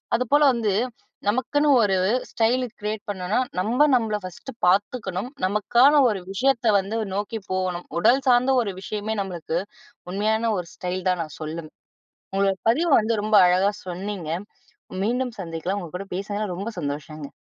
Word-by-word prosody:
அதுபோல 275 +5 +3
வந்து 220 -5 0 0.5
நமக்குன்னு 255 +7 +1
ஒரு 195 -3 +2 0.3
ஸ்டைல் 245 +3 +1 0.2
கிரியேட் 210 0 -3
பண்ணோன்னா, 190 +3 -1 0.2
நம்ம 245 +10 +3
நம்மளை 215 -3 0
ஃபர்ஸ்ட்டு 185 +9 -9
பார்த்துக்கணும். 205 +2 0 0.2
நமக்கான 235 +8 +4 0.2
ஒரு 195 -4 -2
விஷயத்த 245 +2 +1
வந்து 200 +4 -3 0.2
நோக்கி 210 +3 -3
போகணும். 185 -2 -2
உடல் 260 +9 +4
சார்ந்த 250 +2 +4
ஒரு 200 -4 -3
விஷயமே 215 +2 -3
நம்மளுக்கு 175 -3 -3 0.5
உண்மையான 220 +3 +1
ஒரு 170 - -6
ஸ்டைல் 185 -1 -3
தான் 180 -2 +1
நான் 155 -2 -11
சொல்லும். 155 0 -5 0.7
உங்களோட 195 -1 +2
பதிவு 330 +8 +1
வந்து 220 +2 0
ரொம்ப 215 0 +3
அழகா 185 +3 +3 0.2
சொன்னீங்க. 180 -2 -5 0.7
மீண்டும் 245 +1 -1
சந்திக்கலாம். 175 +3 -3
உங்க 170 - -9
கூட 195 - -7
பேசுனது 205 -1 -3
ரொம்ப 200 +5 -4
சந்தோஷங்க. 145 +1 -5
205 Hz, 140 wpm, -24 LUFS, 185-230 Hz, 0.7 s, நமக்கான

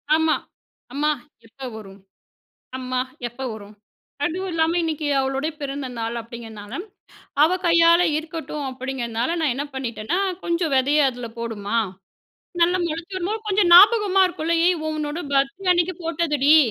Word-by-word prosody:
ஆமா. 320 0 +3 0.6
"அம்மா! 300 +2 +1 0.4
எப்ப 260 +3 -9
வரும்? 200 -2 -11 0.8
அம்மா! 255 0 -2 0.3
எப்ப 240 +3 -11
வரும்?" 210 -1 -11 0.5
அதுவும் 370 +5 -2
இல்லாம 325 +1 +2
இன்னக்கி 315 -2 -2
அவளோட 270 +2 -1
பிறந்த 275 -1 -4
நாள் 230 +1 -3
அப்பிடிங்கிறனால 225 -2 -9 0.7
அவ 315 - +5 0.2
கையால 335 0 +6 0.2
இருக்கட்டும் 315 -2 -5
அப்பிடிங்கிறனால 255 +1 -3
நான் 295 -6 +2
என்ன 285 +2 -3
பண்ணிட்டேன்னா, 250 - -2 0.2
"கொஞ்சம் 340 -2 0
விதைய 280 +2 +4
அதில 245 -2 -7
போடும்மா! 225 -2 -3 0.8
நல்லா 350 +2 +4
முளச்சு 335 +4 -5
வரும்போது, 395 +5 -2
கொஞ்சம் 390 -3 +3
ஞாபகமா 400 +1 +7
இருக்கும்ல 335 -2 -1
ஏய்! 360 0 +3
உன்னோட 305 +1 -3
பர்த்டே 275 +8 +1
அன்னக்கி 350 +1 +1
போட்டதுடி! 310 -2 +3
300 Hz, 130 wpm, -23 LUFS, 255-335 Hz, 0.8 s, ஞாபகமா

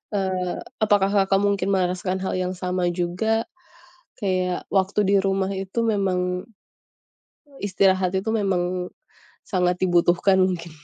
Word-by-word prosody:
eee, 185 -2 -1 0.3
apakah, 205 -2 +3
Kakak, 195 -1 +3
mungkin 200 -1 0
merasakan 185 0 0
hal - - -2
yang 185 0 -2
sama 180 -1 -1
juga? 185 +6 0 0.7
Kayak 185 -3 -1
waktu 195 +1 +1
di 200 - +4
rumah 195 0 0
itu 195 +3 -4
memang 185 -4 0 1.2
Istirahat 190 -2 +2
itu 210 +4 -4
memang 180 -3 -1 0.5
sangat 180 -2 +1
dibutuhkan 175 +1 +3
mungkin 180 -2 0
185 Hz, 115 wpm, -23 LUFS, 180-195 Hz, 1.2 s, di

